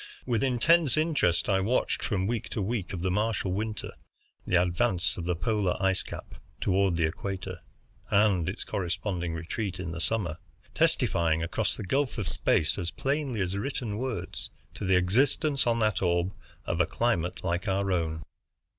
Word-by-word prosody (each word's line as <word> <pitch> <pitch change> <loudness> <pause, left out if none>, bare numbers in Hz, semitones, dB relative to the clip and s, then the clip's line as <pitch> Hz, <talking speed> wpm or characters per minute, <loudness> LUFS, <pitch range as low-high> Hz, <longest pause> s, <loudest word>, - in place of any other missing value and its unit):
With 120 -2 +1
intense 140 +4 +4
interest 155 - +2
I 95 -2 +3
watched 110 +7 +1
from 95 -5 0
week 115 +1 -2
to 105 - -2
week 105 -2 -2
of 90 -2 -4
the 95 - +1
Martial 105 -1 0
winter 105 +2 -3 0.6
the 90 - +4
advance 90 - +1
of 85 - -5
the 90 0 0
polar 100 +1 0
ice 95 -1 +2
cap - - -8 0.3
toward 95 -2 +2
the 85 - +2
equator, 95 +2 -4 0.5
and 100 -4 +3
its 95 - -5
corresponding 90 -1 -2
retreat 95 +4 -4
in 90 -3 -4
the 85 0 -4
summer; 85 -6 0 0.3
testifying 80 -1 +2
across 85 - 0
the - - -5
gulf 135 +7 0
of 100 -5 -2
space 80 +2 +2
as 85 -2 -1
plainly 135 - -1
as 95 +1 -1
written 110 -1 -3
words 130 -3 -4 0.2
to - - -5
the 95 0 +4
existence 130 - +2
on 115 -1 +3
that 110 -2 +2
orb 85 0 +1 0.3
of 85 - +1
a 85 - +2
climate 90 -7 0
like 90 0 -1
our 95 0 +1
own. 80 -3 -1
95 Hz, 170 wpm, -28 LUFS, 90-115 Hz, 0.6 s, intense